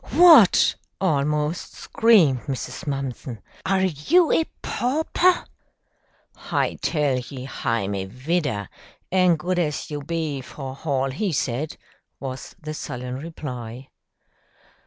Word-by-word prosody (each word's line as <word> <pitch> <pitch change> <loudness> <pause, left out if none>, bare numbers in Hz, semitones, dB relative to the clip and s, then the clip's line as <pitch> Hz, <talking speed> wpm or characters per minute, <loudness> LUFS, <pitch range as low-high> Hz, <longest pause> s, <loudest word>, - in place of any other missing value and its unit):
"What!" 315 - +7 0.2
almost 150 -1 0
screamed 170 - +3
Mrs. 130 0 -5
Mumpson, 135 -4 -4 0.3
"are 190 0 +2
you 190 - +3
a 325 - +3 0.2
pauper?" 320 +7 +1 0.9
"Hi - - -1
tell 145 -5 +1
ye 125 +1 -8
hi'm 115 -6 -2
a 95 -1 -2
vidder, 125 - -2 0.4
an' 185 -2 +4
good 180 +3 -1
as 150 -2 -2
you 145 -1 -3
be, 155 -2 -3
for 130 0 -7
hall 135 -1 -1
he 190 +8 -1
said," 140 +1 -2 0.4
was 130 -1 -7
the 155 -2 -6
sullen 125 -4 -5
reply. 130 -6 -7
150 Hz, 115 wpm, -23 LUFS, 130-175 Hz, 0.9 s, What